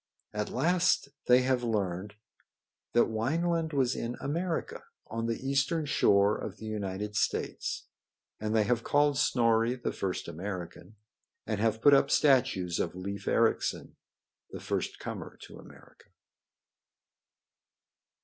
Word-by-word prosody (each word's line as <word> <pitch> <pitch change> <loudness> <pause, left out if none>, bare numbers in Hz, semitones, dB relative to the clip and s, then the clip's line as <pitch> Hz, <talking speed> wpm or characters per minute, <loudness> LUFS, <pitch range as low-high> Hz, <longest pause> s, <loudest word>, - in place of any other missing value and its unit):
At 105 0 -2
last 170 +2 +2 0.2
they 125 +1 +6
have 130 -1 +1
learned 100 -3 -2 0.8
that 120 - +5
Wineland 160 +9 0
was 130 -4 +1
in 120 +1 -3
America, 165 +3 -3 0.2
on 115 +1 -3
the 115 +3 -3
eastern 140 +4 +1
shore 100 -6 +3
of - - -6
the 110 - -9
United 105 -1 -4
States, - - -1 0.5
and 110 +1 -2
they 110 - +4
have 115 +1 0
called 145 0 +3
Snorri 115 -2 +2
the 120 - -3
first 95 -2 -3
American, 90 +2 -7 0.5
and 110 -2 -2
have 110 +1 0
put 145 - +7
up 140 - +5
statues 125 - +3
of - - -2
Leif 100 +2 -6
Ericsson, - - +1 0.5
the - - -8
first - - -3
comer - - -7
to - - -12
America. - - -17
115 Hz, 130 wpm, -30 LUFS, 105-140 Hz, 0.8 s, put